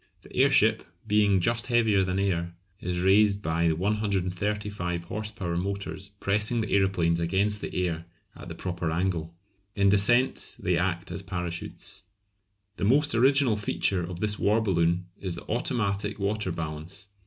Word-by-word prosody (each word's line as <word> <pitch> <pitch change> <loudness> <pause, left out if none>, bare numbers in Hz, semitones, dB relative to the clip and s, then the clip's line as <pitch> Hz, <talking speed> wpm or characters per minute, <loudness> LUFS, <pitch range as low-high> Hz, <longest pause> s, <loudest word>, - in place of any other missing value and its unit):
The - - -14
airship, - - +4 0.2
being 105 -2 +3
just 115 +7 0
heavier 110 -5 +3
than 95 0 -1
air, 85 -3 -1 0.2
is 90 0 -2
raised 100 +2 +4
by 80 +1 +1
the 80 - +2
135 100 -1 -1
horse 105 +5 -5
power 95 -6 -4
motors 95 0 -4
pressing 105 +4 0
the 110 - -4
aeroplanes 90 -4 +2
against 100 +5 +1
the - - -5
air 85 -1 -3 0.3
at - - -10
the - - -7
proper 85 -2 -3
angle. 85 -1 -1 0.4
In 100 -1 +4
descent 120 +6 +2
they - - 0
act 90 -1 -1
as - - -3
parachutes. 90 -3 -6 0.8
The 90 - -4
most 140 +8 +3
original 130 -1 +4
feature 100 -3 0
of 85 0 -6
this 105 -1 -1
war 105 +3 +3
balloon 90 -4 +1
is 90 -3 -4
the - - -8
automatic 105 -3 -1
water 100 -1 -1
balance. 80 +4 -5
100 Hz, 155 wpm, -27 LUFS, 85-105 Hz, 0.8 s, airship